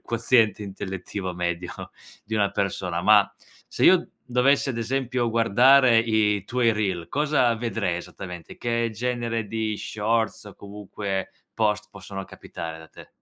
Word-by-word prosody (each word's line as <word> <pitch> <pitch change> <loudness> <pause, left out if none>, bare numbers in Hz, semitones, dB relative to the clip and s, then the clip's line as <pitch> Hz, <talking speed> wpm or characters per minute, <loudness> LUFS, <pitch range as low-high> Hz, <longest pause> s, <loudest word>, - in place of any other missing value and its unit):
quoziente 115 -2 +2
intellettivo 95 -1 -5
medio 85 0 -3 0.5
di 110 +1 -3
una 100 -1 +2
persona. 90 -3 -2
Ma, 105 0 +5 0.4
se - - -5
io - - +5 0.2
dovessi, 135 +3 +2
ad 115 - -4
esempio, 125 0 -1
guardare 120 +3 +5
i 110 -3 +1
tuoi 120 +1 +2
reel, 95 -6 -2
cosa 140 -5 +2
vedrei 115 -6 -2
esattamente? 90 -1 -9
Che 115 -1 -1
genere 115 -1 -2
di 110 0 -2
shorts 110 +2 -1
o 105 - -11
comunque 100 -1 -5 0.2
post 105 -1 0
possono 95 0 -8
capitare 80 -3 -8
da 80 0 -13
te? - - -14
110 Hz, 135 wpm, -24 LUFS, 95-115 Hz, 0.5 s, Ma